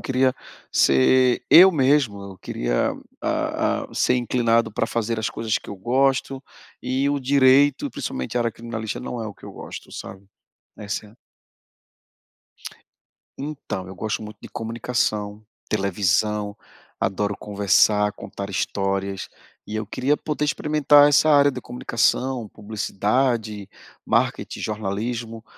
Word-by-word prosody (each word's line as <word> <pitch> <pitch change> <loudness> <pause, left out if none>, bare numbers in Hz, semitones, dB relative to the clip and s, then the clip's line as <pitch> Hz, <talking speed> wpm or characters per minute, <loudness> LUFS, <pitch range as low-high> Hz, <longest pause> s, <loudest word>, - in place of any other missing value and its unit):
queria 130 -1 +1 0.4
ser 125 - +4
eu 185 +3 +10
mesmo, 135 - +2
eu 95 -1 -10
queria, - - -1 0.3
hã - - -1
hã, - - -13
ser 125 - +2
inclinado 115 -2 +1
pra 115 - 0
fazer 115 0 -2
as 110 - -1
coisas 110 -2 -1
que - - -16
eu 100 - -6
gosto. 135 +4 0 0.4
E 130 +3 0
o 145 -1 -1
direito, 135 +1 +4
e - - -3
principalmente 65 - -4
a - - +2
área 115 -2 0
criminalista, 115 -2 -5
não 120 - -5
é 110 - -4
o 105 - -7
que - - -17
eu - - -9
gosto, - - -9
sabe, 95 +1 -9 0.5
essa 105 0 -5
é - - -16
a 110 - -22 2.2
Então, 140 -10 -5
eu 95 - -9
gosto 110 +3 -3
muito 105 -1 -10
de - - -10
comunicação, 110 -2 -2 0.2
televisão, 105 +1 0 0.4
adoro 100 +1 -1
conversar, 105 0 +2
contar 100 0 -7
histórias, 95 0 -2 0.4
e 105 - -7
eu 110 0 -2
queria 135 +8 0
poder 150 0 -3
experimentar 145 -1 +4
essa 145 +2 +4
área 145 -1 +6
de 130 -2 -6
comunicação, 125 0 -1
publicidade, 110 +1 -1 0.4
marketing, - - 0
jornalismo, 110 +2 -4
115 Hz, 135 wpm, -23 LUFS, 105-130 Hz, 2.2 s, eu